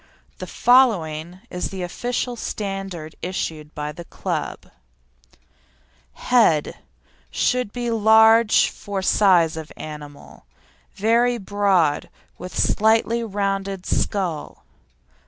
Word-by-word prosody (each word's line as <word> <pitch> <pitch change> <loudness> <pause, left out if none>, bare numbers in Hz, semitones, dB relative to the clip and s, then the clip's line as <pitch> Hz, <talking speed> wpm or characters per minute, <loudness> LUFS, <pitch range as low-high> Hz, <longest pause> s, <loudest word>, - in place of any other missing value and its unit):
The - - -6
following 180 -9 +2
is 180 - -3
the 190 -2 -6
official 245 +6 -3
standard 195 -8 -5
issued 160 -4 -5
by 150 0 -4
the 170 +3 -10
Club: - - -5 1.4
HEAD 220 -12 +2 0.5
Should 250 - 0
be 240 0 -3
large 220 0 +5
for 200 -2 -5
size 180 -5 +3
of 160 -1 -8
animal, 150 -2 -10 0.5
very 235 +4 +2
broad 195 -7 +1
and - - -25 0.3
with 180 - -7
slightly 225 +2 +2
rounded 195 -2 -3
skull. 180 -7 -2
195 Hz, 100 wpm, -22 LUFS, 165-225 Hz, 1.4 s, large